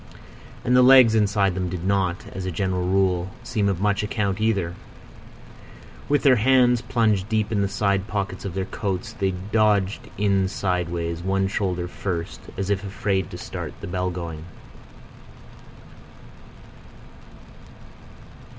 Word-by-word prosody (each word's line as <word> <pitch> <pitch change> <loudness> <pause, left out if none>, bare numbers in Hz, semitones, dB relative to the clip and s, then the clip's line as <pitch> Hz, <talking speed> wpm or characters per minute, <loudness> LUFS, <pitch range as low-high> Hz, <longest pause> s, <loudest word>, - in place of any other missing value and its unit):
And 125 0 +2
the 125 - +7
legs 125 -3 +7
inside 100 -3 +2
them 90 0 -2
did 90 0 -5
not, 95 -2 0
as 95 -1 -5
a - - -2
general 90 0 -1
rule, 95 -1 +1
seem 105 -4 0
of 95 -3 -1
much 100 -1 +1
account 105 -1 -2
either. 100 -6 0 1.4
With 145 0 +2
their 130 -3 +6
hands 125 0 +4
plunged 110 -5 +1
deep 110 -1 0
in 105 -2 +1
the 100 - +1
side 100 0 0
pockets 100 -2 -3
of 95 -3 -5
their 95 -1 -1
coats, 95 -2 -4
they 95 -1 0
dodged 100 +1 0
in 100 -2 +2
sideways, 85 -3 -2
one 95 +1 0
shoulder 90 -3 -2
first, 90 -2 -4 0.2
as 100 +1 -2
if 100 0 0
afraid 100 -2 -1
to - - -8
start - - -6
the - - -7
bell 90 0 -2
going. 85 -3 -6
95 Hz, 140 wpm, -23 LUFS, 90-105 Hz, 1.4 s, the